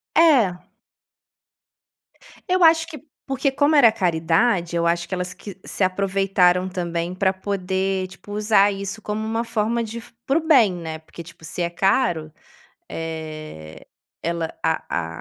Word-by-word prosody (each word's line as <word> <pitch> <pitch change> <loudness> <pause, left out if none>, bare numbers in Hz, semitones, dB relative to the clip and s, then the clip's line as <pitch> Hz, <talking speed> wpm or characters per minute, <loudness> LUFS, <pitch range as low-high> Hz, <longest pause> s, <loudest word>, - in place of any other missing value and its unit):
É. 245 - +4 1.9
Eu 365 0 +3
acho 325 0 +5
que 305 -5 -9 0.2
porque 270 +1 0
como 285 +3 +3
era 265 -6 +8
caridade, 175 +1 +1
eu 170 0 +1
acho 170 0 0
que - - -6
elas 180 0 -4
que 200 -3 -10
se - - -7
aproveitaram 185 -1 +2
também 175 -1 -3
pra 190 0 +2
poder, 190 0 -2
tipo, 205 +2 -11
usar 210 -1 +4
isso 200 +2 -5
como 215 +1 -3
uma 225 +1 -1
forma 230 +1 0
de 230 +1 -5
fu - - -17
para 275 +4 +2
o 320 - -9
bem, 250 - +5
né, 160 -2 -6
porque, 165 +1 -11
tipo, 165 -1 -14
se 175 - -5
é 170 - 0
caro, 175 -3 +1 0.6
eh, 155 - -7 0.3
ela 170 -1 -2
a 80 0 -2
190 Hz, 150 wpm, -22 LUFS, 170-225 Hz, 1.9 s, era